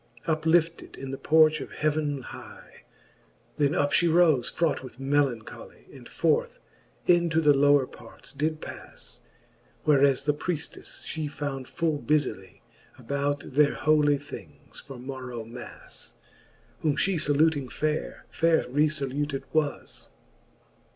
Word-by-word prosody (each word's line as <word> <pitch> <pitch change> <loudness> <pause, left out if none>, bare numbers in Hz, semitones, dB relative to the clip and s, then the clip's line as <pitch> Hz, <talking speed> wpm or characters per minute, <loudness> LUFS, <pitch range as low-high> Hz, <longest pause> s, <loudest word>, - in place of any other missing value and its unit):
Up 160 0 -1
lifted 165 0 +1
in 135 0 -7
the 135 - -4
porch 155 -1 +4
of - - -8
heaven 150 -3 -1
hie. - - -12 0.7
Then 145 0 +2
up 145 0 +1
fhe 170 -1 +3
rofe 160 -7 +4
fraught 160 -5 0
with 130 -1 -11
melancholy, 135 -5 -2
And - - -13
forth - - 0 0.5
into 170 -2 +3
the 150 -2 +5
lower 145 -1 +4
parts 115 -2 -14
did 155 +2 -2
pas; - - -10 0.6
Whereas 140 -2 +4
the 150 +1 +2
prieftes 160 +1 -6
fhe 155 -2 -4
found 140 -3 -5
full 160 -3 -1
bufily 140 -12 -1 0.4
About 140 0 -3
their 145 +1 +4
holy 150 -1 +3
things 95 - -11
for 135 -2 -10
morrow 125 -2 -7
Mas: 120 +2 -10 0.6
Whom 150 -3 +1
fhe 190 -5 +1
faluting 145 -2 +2
faire, 155 0 -3
faire 165 -1 +2
rcfaluted 145 0 -1
was. 155 -2 -2
145 Hz, 125 wpm, -27 LUFS, 135-155 Hz, 0.7 s, the